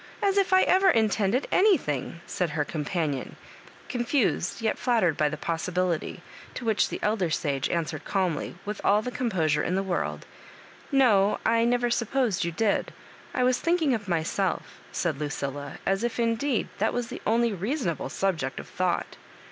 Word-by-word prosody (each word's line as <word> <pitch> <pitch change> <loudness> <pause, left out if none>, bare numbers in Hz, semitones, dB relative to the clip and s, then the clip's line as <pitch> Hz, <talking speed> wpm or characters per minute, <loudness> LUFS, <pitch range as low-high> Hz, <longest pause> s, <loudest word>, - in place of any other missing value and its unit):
as 395 -1 +2
if 395 -2 +2
I 375 0 +6
ever 380 +1 +4
intended 220 - +2
anything," 170 - +2
said 180 -2 -1
her 150 -1 -1
companion, 150 -2 -2 0.5
confused, 245 - 0
yet 225 -1 -1
flattered, 225 - +2
by 150 0 +2
the 155 - -5
possibilifjr; 170 +1 -2 0.3
to 245 - -5
which 220 -2 +2
the - - -4
elder 210 -5 +1
sage 140 -4 -1
answered 160 -2 -2
calmly, 185 -5 -1
with 210 0 -4
all 210 +2 +4
the 250 - -3
composure 170 - +1
in 180 - -1
the 195 - +1
world": 185 -3 -2 0.4
" - - -22
No, 205 -2 +4
I 230 0 +3
never 240 0 +2
supposed 235 -3 +1
you 170 - -1
did; 205 +5 0 0.4
I 250 - +2
was 250 0 +3
thmk 345 +2 +2
ing 280 -4 +3
of 210 -3 -3
myself," 175 +2 -1
said 160 -5 -1
Lucilla, 145 -1 -4
as 195 +3 +1
if, 240 0 -2
indeed, 235 +2 0
that 220 - +1
was 245 -1 -2
the - - -7
only 230 +1 +2
reasonable 200 - -2
subject 165 -9 -1
of - - -8
thought. 180 -1 -1
200 Hz, 170 wpm, -27 LUFS, 165-240 Hz, 0.5 s, I